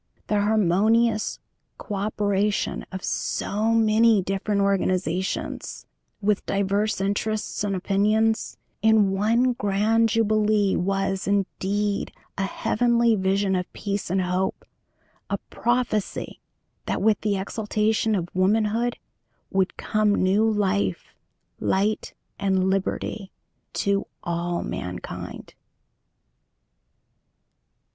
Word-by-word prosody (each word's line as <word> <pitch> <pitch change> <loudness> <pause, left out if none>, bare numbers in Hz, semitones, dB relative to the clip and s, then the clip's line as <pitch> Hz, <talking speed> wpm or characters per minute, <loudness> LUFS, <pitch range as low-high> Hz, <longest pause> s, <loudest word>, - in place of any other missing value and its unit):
The 210 -1 +1
harmonious 215 +2 +2 0.4
co 210 - -7
operation 205 0 0
of 190 -1 -6
so 215 +2 -1
many 220 -2 +4
different 195 +2 -1
organizations, 185 -2 -1 0.4
with 205 0 +1
divers 200 +2 0
interests 205 +2 -1
and 200 -1 0
opinions, 210 +4 +1 0.2
in 220 -3 +4
one 230 +6 +2
grand 220 +2 +2
jubilee 215 -2 +2
was, 195 +1 -1
indeed, 200 +1 -1 0.2
a 195 - -1
heavenly 235 +3 +2
vision 195 0 +1
of 180 -1 -3
peace 200 -2 -3
and 190 +1 +1
hope; 180 +1 -1 0.6
a - - 0
prophecy 240 -4 -1 0.5
that - - -1
with 215 0 +2
the 205 -2 0
exaltation 215 +2 0
of 175 -3 -1
Womanhood 215 +5 +1 0.5
would 190 -1 0
come 215 -1 +1
new 200 +4 +3
Life, 205 -2 0 0.5
Light, 205 +3 0 0.2
and 190 -1 +2
Liberty 195 +1 -2 0.4
to 200 0 0 0.2
all 175 0 -2
mankind. 90 0 -6
205 Hz, 95 wpm, -24 LUFS, 195-215 Hz, 0.6 s, many